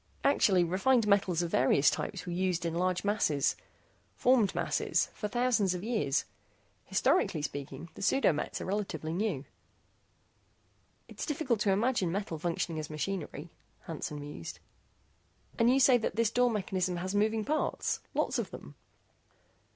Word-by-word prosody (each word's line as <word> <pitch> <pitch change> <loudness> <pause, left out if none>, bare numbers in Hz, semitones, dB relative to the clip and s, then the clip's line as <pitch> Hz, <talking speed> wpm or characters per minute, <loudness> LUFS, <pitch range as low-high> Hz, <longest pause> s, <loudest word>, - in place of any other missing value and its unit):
Actually, 200 -10 +4
refined 210 +7 +2
metal 200 -2 +3
of 170 - -2
various 140 -4 +3
types - - -4
was 175 -1 -4
used 180 -1 0
in 165 - -1
large 180 +1 0
masses, 180 -9 +1 0.6
formed 240 -6 +3
masses, - - 0
for 210 - -4
thousands 230 -4 +1
of 180 - -5
years. 215 - 0 0.6
Historically 150 - +1
speaking, 145 +1 -5
the - - -11
pseudo 195 -2 +3
mets 150 - -3
are - - -5
relatively 190 -5 -3
new." 180 -7 -1 1.6
"It's - - -7
difficult 275 -7 0
to 205 -1 +2
imagine 205 -3 +1
metal 185 -4 -3
functioning 165 -1 -2
as 155 - -5
machinery," 155 0 -4 0.3
Hansen 150 -2 -5
mused. 145 - -7 1.0
"And 230 +1 +5
you 265 - +4
say 255 -2 +6
that 220 - -2
this 230 -1 +2
door 245 +1 +3
mechanism 185 -4 -1
has 185 +2 -3
moving 215 +1 +1
parts, 310 +1 -1 0.2
lots - - 0
of - - -3
them?" - - -10
190 Hz, 145 wpm, -31 LUFS, 165-220 Hz, 1.6 s, say